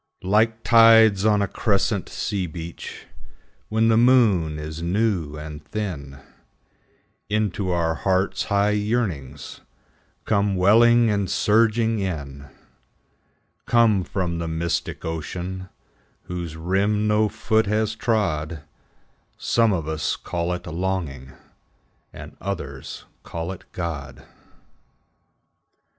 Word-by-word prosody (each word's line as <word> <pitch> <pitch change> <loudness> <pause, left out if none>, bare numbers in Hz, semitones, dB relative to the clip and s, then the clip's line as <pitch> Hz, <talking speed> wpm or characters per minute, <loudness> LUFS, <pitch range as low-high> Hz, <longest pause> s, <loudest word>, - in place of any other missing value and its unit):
Like 110 +4 +2
tides 115 -3 +6
on 105 -2 +3
a - - 0
crescent 100 -1 0
sea 100 -4 -2
beach, 85 +1 -8 0.6
When 110 +1 +2
the 110 - +4
moon 110 -11 +4
is 75 +1 -6
new 90 -4 0
and 75 -1 -8
thin, 75 -6 -5 1.1
Into 105 -2 -1
our 85 -2 +1
hearts 95 +2 0
high 100 +1 +2
yearnings 100 - -2 0.6
Come 100 -1 +1
welling 115 +5 +5
and 100 -3 -1
surging 115 +1 +2
in, 70 -7 -5 1.2
Come 115 -5 +4
from 90 -3 -3
the 85 - -3
mystic 80 +1 -3
ocean 90 +4 -5 0.5
Whose 85 -3 -6
rim 100 +5 +1
no 105 0 +3
foot 110 0 +1
has 110 +1 0
trod, 85 -10 -1 0.7
Some 115 -2 +2
of 85 -5 -2
us 80 -1 -1
call 85 0 -3
it 90 - -6
longing, 80 -7 -3 0.8
And - - -11
others 70 -9 -6 0.2
call 85 +2 -5
it 95 - -10
God. 75 -7 -6
95 Hz, 105 wpm, -23 LUFS, 80-110 Hz, 1.2 s, tides